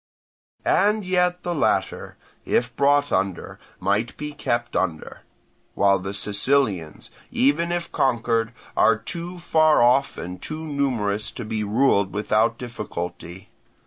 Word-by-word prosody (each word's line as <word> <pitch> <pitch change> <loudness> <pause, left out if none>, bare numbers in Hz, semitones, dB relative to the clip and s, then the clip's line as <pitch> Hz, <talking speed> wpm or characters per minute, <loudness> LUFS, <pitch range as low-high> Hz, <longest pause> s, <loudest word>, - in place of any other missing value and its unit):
"And 210 0 +2
yet 180 -1 +1
the 175 - -2
latter, 150 - -1 0.3
if 120 0 0
brought 145 +1 +3
under, 95 -2 -2 0.2
might 100 +5 0
be 150 0 -5
kept 120 -4 -2
under; 85 -5 -2 0.5
while 100 -1 +3
the 95 +2 -5
Sicilians, 105 - 0 0.2
even 155 +6 +2
if 175 -1 -3
conquered, 115 -3 +1 0.2
are 115 -1 +4
too 170 +10 -7
far 155 -3 +3
off 130 +3 +3
and 90 +1 -7
too 155 +1 -6
numerous 125 -9 -1
to 120 - -7
be 110 0 -2
ruled 105 -2 +2
without 110 +2 +1
difficulty. 90 -6 -7
120 Hz, 125 wpm, -23 LUFS, 100-150 Hz, 0.5 s, are